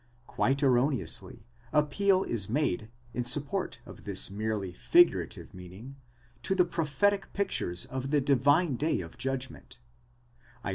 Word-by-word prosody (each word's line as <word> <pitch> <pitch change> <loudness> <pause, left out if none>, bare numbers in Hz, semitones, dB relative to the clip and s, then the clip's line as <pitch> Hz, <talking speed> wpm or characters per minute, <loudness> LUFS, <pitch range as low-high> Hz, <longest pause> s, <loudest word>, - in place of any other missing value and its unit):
® - - -35 0.2
Quite 135 +4 0
erroneously, 130 -2 +1 0.3
appeal 185 +6 +2
is 105 -5 -2
made, 115 -5 -1 0.2
in 125 - -1
support 140 +4 -1
of - - -12
this 95 -2 +2
merely 105 -3 -3
figurative 345 - +2
meaning, 95 +9 -11 0.5
to 190 - 0
the 180 -2 +4
prophetic 170 +4 0
pictures 90 - 0
of 130 +1 -5
the 150 0 +3
divine 140 +2 +3
day 155 -6 0
of 80 -1 -11
judgment, 130 - -4 0.9
Isa. - - -1
135 Hz, 135 wpm, -29 LUFS, 110-155 Hz, 0.9 s, the